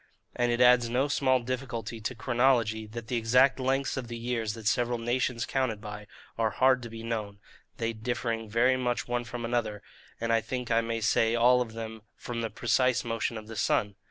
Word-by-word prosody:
And 120 0 +1
it 120 +1 +1
adds 125 -1 +6
no 130 +4 +1
small 130 -3 +2
difficulty 120 -3 -4
to 125 +4 -3
chronology, 120 -3 +1
that 115 +2 -7
the 120 +2 -2
exact 125 +4 +4
lengths 135 +2 0
of 130 -2 -4
the 120 0 -6
years 115 -2 -2
that 110 -2 -10
several 120 +2 +1
nations 120 0 -1
counted 130 -6 -1
by, 105 -1 -8 0.3
are 110 -1 +3
hard 130 +3 +3
to 120 - -7
be 115 0 -8
known, 110 -3 -3 0.4
they 115 0 -1
differing 115 -1 -3
very 125 +4 +3
much 125 -1 -1
one 120 0 -1
from 120 -1 -5
another, 110 -4 -2 0.4
and 115 0 0
I 115 - +3
think 125 +1 -4
I 115 0 +4
may 115 0 -3
say 115 +1 +2
all 125 +1 +5
of 115 -3 -4
them 110 -1 -7
from 120 -1 -5
the 115 - -2
precise 125 +3 +1
motion 115 -1 -2
of 110 - -8
the 115 +1 -9
sun. 105 -1 +1
115 Hz, 205 wpm, -29 LUFS, 115-125 Hz, 0.4 s, adds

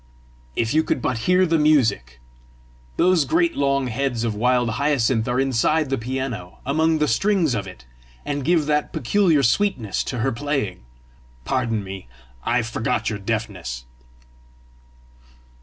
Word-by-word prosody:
"If 115 +1 0
you 160 +1 +3
could - - -1
but 125 -1 -1
hear 180 +1 +5
the 165 -2 +2
music! 110 - +2 0.8
Those 180 -3 +4
great 335 - +1
long 140 -1 +1
heads 125 -1 -2
of 115 -2 -1
wild 120 +2 +1
hyacinth 130 -6 +1
are 125 +1 0
inside 135 +3 +1
the 135 - +1
piano, 120 -7 -4
among 160 +4 +2
the 150 -1 +1
strings 175 - +2
of 100 -4 -3
it, 90 -10 -12 0.4
and 145 -1 -2
give 165 +1 +2
that 150 0 0
peculiar 165 - +2
sweetness 120 - +1
to 125 - -4
her 130 +3 0
playing! 125 - -3 0.6
Pardon 115 -5 -1
me: 95 -5 -8 0.4
I 120 0 +1
forgot 110 0 -1
your 105 - -4
deafness!" 100 - -4
130 Hz, 140 wpm, -22 LUFS, 110-150 Hz, 0.8 s, hear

